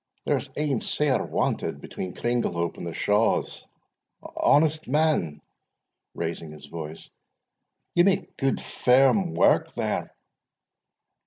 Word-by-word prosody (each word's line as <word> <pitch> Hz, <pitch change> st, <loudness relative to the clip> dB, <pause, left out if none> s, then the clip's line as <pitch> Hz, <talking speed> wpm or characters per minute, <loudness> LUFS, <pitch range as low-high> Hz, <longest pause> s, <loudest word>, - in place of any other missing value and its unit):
There's -, -, 0 dB
ane 145 Hz, -5 st, 0 dB
sair 145 Hz, -3 st, +1 dB
wanted -, -, -1 dB
between 90 Hz, -, -6 dB
Cringlehope 100 Hz, -9 st, -1 dB
and 85 Hz, -, -5 dB
the -, -, -4 dB
Shaws. 105 Hz, +2 st, +1 dB, 0.7 s
Honest 155 Hz, +1 st, +3 dB
man" 130 Hz, -, +1 dB, 0.7 s
(raising 80 Hz, -1 st, -4 dB
his 75 Hz, -, -12 dB
voice), 80 Hz, +1 st, -8 dB, 0.8 s
"ye 175 Hz, -, +5 dB
make 190 Hz, 0 st, +1 dB
good 135 Hz, -1 st, 0 dB
firm 135 Hz, +9 st, +3 dB
wark -, -, +3 dB
there?" -, -, -2 dB
125 Hz, 105 wpm, -26 LUFS, -, 0.8 s, ye